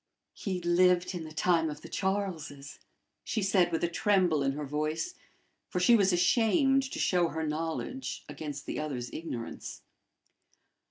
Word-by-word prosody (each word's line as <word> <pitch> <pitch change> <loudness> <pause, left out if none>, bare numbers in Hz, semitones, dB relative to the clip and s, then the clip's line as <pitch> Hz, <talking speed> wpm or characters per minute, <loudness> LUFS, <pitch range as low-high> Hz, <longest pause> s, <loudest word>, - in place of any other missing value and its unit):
"He 190 -3 -3
lived 180 +1 +3
in 170 -3 -5
the 155 - -9
time 165 +1 +2
of 150 0 -7
the - - -10
Charleses," 170 -8 -3 0.4
she 220 - -1
said, 185 -3 +3
with 165 - -1
a - - +4
tremble 180 -3 +2
in 135 0 +1
her 150 +1 -4
voice, 155 - -2 0.6
for 180 - -1
she 205 +7 +6
was 195 -3 +4
ashamed 240 - +3
to - - -5
show 175 -2 +2
her 160 -1 -3
knowledge 160 +12 -3
against 145 -3 -6
the - - -3
other's 130 -5 -4
ignorance. 115 - -6
170 Hz, 155 wpm, -30 LUFS, 150-190 Hz, 0.6 s, she